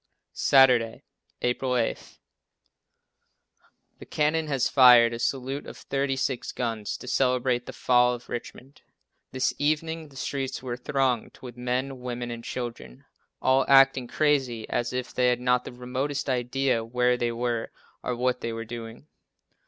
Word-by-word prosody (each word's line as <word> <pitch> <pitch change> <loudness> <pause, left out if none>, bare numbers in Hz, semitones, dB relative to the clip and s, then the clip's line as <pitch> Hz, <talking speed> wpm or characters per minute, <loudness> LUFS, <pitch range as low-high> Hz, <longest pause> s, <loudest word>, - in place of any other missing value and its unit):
Saturday, 125 -4 +4 0.4
April 125 +1 0
8. 115 - -3 1.8
The - - -10
cannon 155 +1 0
has 135 -4 +1
fired 120 -3 +7
a 115 - -5
salute 135 +3 -2
of - - -9
thirty 135 0 -2
six 135 -2 -2
guns 115 -4 -3
to - - -11
celebrate 125 -1 +1
the - - -7
fall 125 0 +3
of 120 - -13
Richmond. 125 +3 -8 0.5
This 130 0 0
evening 155 +1 -1
the 135 - -19
streets 135 -1 -4
were 125 -2 -3
thronged 130 -2 -1
with 125 -2 -8
men, 125 +2 -2
women 120 -1 -5
and 115 0 -7
children 120 - -7 0.4
all 130 +1 +4
acting 135 -2 +5
crazy 135 -6 0
as 120 0 -1
if 125 0 -4
they 125 0 +2
had 125 -1 +2
not 125 0 +1
the - - -7
remotest 130 +3 -3
idea 125 -1 0
where 125 +2 +1
they 120 -1 -1
were 120 -1 -2 0.3
or 125 - -2
what 125 +1 0
they 115 - -3
were 115 0 -5
doing. 115 +2 -8
125 Hz, 150 wpm, -26 LUFS, 120-135 Hz, 1.8 s, fired